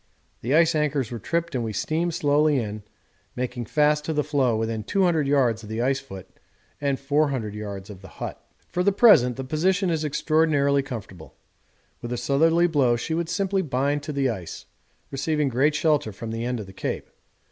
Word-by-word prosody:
The 130 +6 +1
ice 165 +1 +5
anchors 145 -6 0
were 120 - -5
tripped 170 +8 -2
and 125 -3 -1
we 110 -1 -3
steamed 165 - -1
slowly 150 0 +3
in, 110 -3 -3 0.5
making 125 -1 -3
fast 150 +4 +2
to 160 - -1
the 150 -1 +1
floe 140 -5 +1
within 110 -1 -2
200 175 - +1
yards 125 -6 +2
of 105 - -11
the 110 +1 -3
ice 135 +3 +1
foot 95 -9 -10 0.5
and 140 -2 0
400 140 -6 0
yards 100 -2 -6
of 95 -2 -12
the 95 - -11
hut. - - -7 0.2
For 180 - -2
the 200 +2 +3
present 190 - +6
the 135 - -5
position 180 +7 +1
is 160 -1 -1
extraordinarily 150 -2 +2
comfortable. 100 - -9 0.7
With 120 - -6
a 125 - -2
southerly 165 +7 +3
blow 140 -8 +3
she 120 +7 -3
would 170 0 -1
simply 195 +2 0
bind 140 -2 0
on - - -5
to 150 - -4
the 135 -2 +1
ice, 95 -7 -7 0.5
receiving 150 +1 0
great 135 +5 +2
shelter 150 -5 +1
from 110 +3 -7
the 115 +1 -3
end 125 -1 -2
of 105 - -6
the 95 - -13
Cape. - - -4
140 Hz, 195 wpm, -24 LUFS, 120-155 Hz, 0.7 s, present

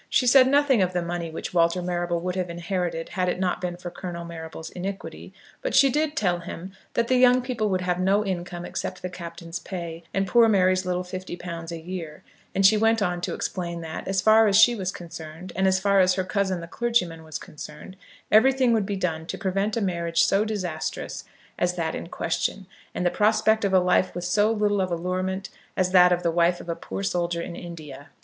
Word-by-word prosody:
She 255 - +2
said 255 +1 +7
nothing 280 -4 +4
of 185 0 +1
the 175 -1 0
money 170 -1 -3
which 160 - -6
Walter 170 +1 +3
Marrable 175 -1 -1
would 180 +1 -2
have 180 -2 -2
inherited 170 -1 -3
had 180 0 -1
it 180 - -2
not 180 -1 -1
been 175 -1 -3
for 175 0 -7
Colonel 175 -1 -6
Marrable's 160 -1 -8
iniquity; 195 +2 -6 0.3
but - - -2
she 275 -1 +6
did 300 +2 0
tell 180 -4 +1
him 175 +2 -8 0.2
that 235 0 +1
the 255 - +3
young 250 0 +5
people 240 -4 -1
would 185 -1 0
have 180 0 -1
no 195 +3 +2
income 175 -2 -4
except 185 0 -5
the 180 - -4
Captain's 170 -1 -7
pay, 170 -3 -6
and 195 0 0
poor 230 +5 +5
Mary's 185 -2 +3
little 180 0 -1
fifty 185 0 -6
pounds 170 -2 -6
a 165 - -5
year; 165 -2 -7 0.3
and 195 0 +3
she 215 +3 +7
went 225 +1 +3
on 180 -3 -1
to - - -2
explain 170 -2 -4
that, 160 -1 -6
as 190 -1 +1
far 220 +2 +6
as 200 - +3
she 220 +3 +7
was 190 -5 -2
concerned, 170 0 -9
and 190 0 +2
as 190 0 +3
far 200 0 +3
as 185 -1 +4
her 185 - 0
cousin 190 -1 -1
the 170 - -8
clergyman 180 -7 0
was 155 0 -6
concerned, 150 +4 -10 0.4
everything 255 +2 +5
would 215 -4 +1
be 205 - -2
done 165 -4 -2
to - - -4
prevent 195 +2 -1
a - - 0
marriage 170 -3 +1
so 195 +2 +3
disastrous 185 -7 -4 0.3
as 175 0 +1
that 165 -2 -2
in - - -5
question, 180 +4 -2 0.3
and 180 - -1
the 175 - +3
prospect 220 +1 +3
of 200 - +1
a 190 - +6
life 180 0 +2
with 175 0 -4
so 205 +4 +3
little 205 -2 +1
of 185 - -1
allurement 185 +3 -2 0.3
as 185 -1 +1
that 180 -1 +7
of 180 0 +1
the 170 - +2
wife 175 +1 +2
of - - -11
a 170 - -1
poor 195 - -6
soldier 175 -3 -1
in 170 - -7
India. 155 -6 -9
180 Hz, 220 wpm, -25 LUFS, 170-200 Hz, 0.4 s, said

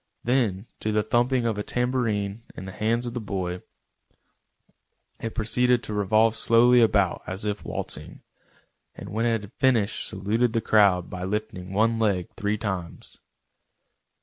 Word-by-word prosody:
Then 115 -6 +1
to 110 - -1
the 105 0 +1
thumping 120 +2 +1
of 110 -3 -1
a - - -2
tambourine 115 -5 -1
in 95 - -7
the 95 - -7
hands 115 +5 0
of 120 - -4
the 120 - -3
boy, 90 -3 -3 1.6
it 115 - -5
proceeded 125 +2 +2
to 105 - -5
revolve 110 +2 +3
slowly 120 +2 +5
about 100 -5 +2
as 95 +3 -4
if 105 -1 -2
waltzing, - - -6 0.7
and - - -9
when 115 +3 0
it 115 -2 +1
had 105 +3 -12
finished 115 -6 +2
saluted 110 +5 0
the 115 - +2
crowd 100 -5 +4
by 90 - -6
lifting 95 -1 -4
one 115 +3 +2
leg 100 -5 +1
three 105 +1 -1
times. 95 -6 -5
110 Hz, 150 wpm, -25 LUFS, 100-115 Hz, 1.6 s, slowly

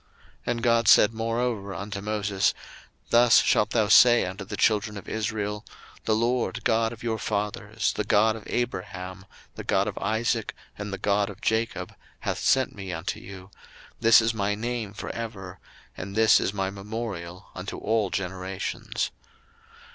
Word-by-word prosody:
02:003:015 - - -36 0.4
And 120 -1 -1
God 115 -1 +3
said 105 - +7
moreover 115 -3 -2
unto 100 +2 -5
Moses, 105 -2 0 0.6
Thus 120 -1 +7
shalt 105 - +3
thou 110 -3 +2
say 120 +1 +7
unto 95 +2 -6
the 100 +1 -6
children 105 +1 +2
of 100 - -10
Israel, 105 -1 -3 0.4
the 110 - +2
LORD 120 +2 0
God 115 -1 +2
of 120 0 -10
your 110 -2 -1
fathers, 105 +1 -2
the 105 - -2
God 110 +1 +3
of 110 - -8
Abraham, 95 -5 -4 0.3
the - - -7
God - - +1
of - - -4
Isaac, 110 +2 -1 0.2
and 105 0 -6
the 100 - -3
God 100 0 +1
of 100 -1 -10
Jacob, 110 +1 -1 0.3
hath - - -2
sent 130 -1 +2
me 95 -2 -7
unto 80 +1 -4
you: 95 -1 -11 0.5
this 115 -1 +7
is 115 0 +1
my 105 -1 0
name 115 -2 -3
for 110 - -6
ever, 95 -5 -7 0.4
and 100 +2 -7
this 110 0 +6
is - - 0
my 95 -1 -2
memorial 100 -3 -6
unto 90 +2 -6
all 110 -2 0
generations. 95 +1 -3
105 Hz, 160 wpm, -26 LUFS, 100-115 Hz, 0.6 s, said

